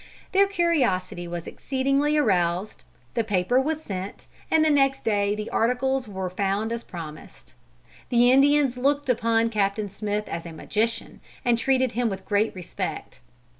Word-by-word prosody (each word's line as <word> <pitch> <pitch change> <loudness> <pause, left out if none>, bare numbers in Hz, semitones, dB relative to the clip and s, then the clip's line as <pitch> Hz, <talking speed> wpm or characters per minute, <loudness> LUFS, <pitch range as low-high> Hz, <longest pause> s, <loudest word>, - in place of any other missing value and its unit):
Their 395 +1 +4
curiosity 270 - 0
was 170 -1 -5
exceedingly 275 +3 0
aroused; 185 - 0 0.3
the 230 - +1
paper 210 +4 +2
was 310 +3 -2
sent, 190 -3 -6 0.2
and 315 -1 +4
the 310 - +4
next 275 -1 +2
day 205 -1 +1
the 210 +1 -5
articles 250 +2 +1
were 190 -2 -4
found 200 +4 -1
as 235 0 -2
promised. 160 -7 -10 0.6
The 245 0 +5
Indians 275 -1 +4
looked 280 +2 +1
upon 230 -1 +2
Captain 205 0 0
Smith 210 +1 -3
as 170 +1 -5
a 165 - -8
magician, 220 +8 -2 0.2
and 240 -1 +4
treated 260 +1 +1
him 240 -1 0
with 190 -1 -6
great 210 +1 +1
respect. 180 -3 -5
230 Hz, 150 wpm, -25 LUFS, 195-270 Hz, 0.6 s, The